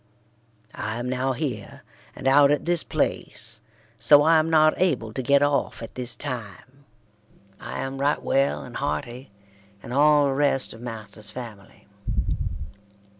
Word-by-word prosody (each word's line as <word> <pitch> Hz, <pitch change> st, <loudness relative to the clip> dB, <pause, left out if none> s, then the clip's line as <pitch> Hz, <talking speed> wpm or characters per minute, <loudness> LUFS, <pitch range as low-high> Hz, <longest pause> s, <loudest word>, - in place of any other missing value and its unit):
I 110 Hz, +1 st, -4 dB
am 120 Hz, +1 st, -4 dB
now 130 Hz, +1 st, 0 dB
here 125 Hz, -7 st, -5 dB, 0.3 s
and 130 Hz, -, -4 dB
out 140 Hz, +1 st, +6 dB
at 145 Hz, 0 st, +1 dB
this 175 Hz, -1 st, +2 dB
pleace -, -, -3 dB, 0.4 s
so 145 Hz, +6 st, +6 dB
I 160 Hz, +1 st, +5 dB
am 155 Hz, +1 st, 0 dB
not 155 Hz, -1 st, +5 dB
abble 125 Hz, -12 st, +1 dB
to 130 Hz, -, -2 dB
get 140 Hz, +3 st, +4 dB
of 145 Hz, 0 st, 0 dB
at 115 Hz, -, -9 dB
this 125 Hz, -2 st, -2 dB
time. 130 Hz, +2 st, -7 dB, 0.7 s
I -, -, -5 dB
am 135 Hz, 0 st, -4 dB
write 145 Hz, +1 st, +1 dB
well 135 Hz, -, +1 dB
and -, -, -8 dB
hearty 120 Hz, -, -4 dB, 0.5 s
and -, -, -7 dB
all 145 Hz, +1 st, +5 dB
the 135 Hz, -, +1 dB
rest 140 Hz, -1 st, +1 dB
of 115 Hz, -, -12 dB
masters 110 Hz, -3 st, -8 dB
family. 110 Hz, -6 st, -10 dB
135 Hz, 150 wpm, -25 LUFS, 115-145 Hz, 0.7 s, out